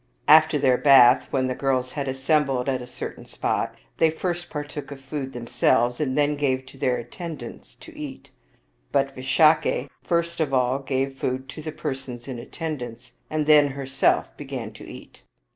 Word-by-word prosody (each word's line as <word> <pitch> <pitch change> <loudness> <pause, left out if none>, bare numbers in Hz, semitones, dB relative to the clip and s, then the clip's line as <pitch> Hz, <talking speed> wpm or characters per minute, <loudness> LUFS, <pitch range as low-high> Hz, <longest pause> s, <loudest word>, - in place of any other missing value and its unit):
After 155 0 +7
their 130 -3 +3
bath, 130 -3 +7
when 130 -2 0
the 130 - -1
girls 130 -1 -1
had 140 +1 -4
assembled 135 -1 +1
at 130 -2 0
a 125 - -8
certain 125 - -8
spot, - - -2 0.2
they 160 - +4
first 175 +2 -3
partook 150 -1 -6
of 140 - -8
food 135 0 -5
themselves, 120 0 +1
and 135 -3 -1
then 145 0 +2
gave 130 -2 0
to 135 - -14
their 130 -3 +1
attend 155 +4 -7
ants 120 - -10
to - - -14
eat; - - -8 0.6
but 135 0 +1
Visakha 155 +5 +3
first 170 0 0
of 145 -4 +1
all 130 +1 +2
gave 135 0 -2
food 130 +1 -2
to 155 - -8
the 155 0 -5
persons 130 -5 -5
in 130 -3 -5
attendance, 125 -4 -6 0.2
and 155 -1 -1
then 150 -1 +6
herself 135 0 0
began 130 -6 -6
to - - -13
eat. - - -12
135 Hz, 175 wpm, -24 LUFS, 130-150 Hz, 0.6 s, After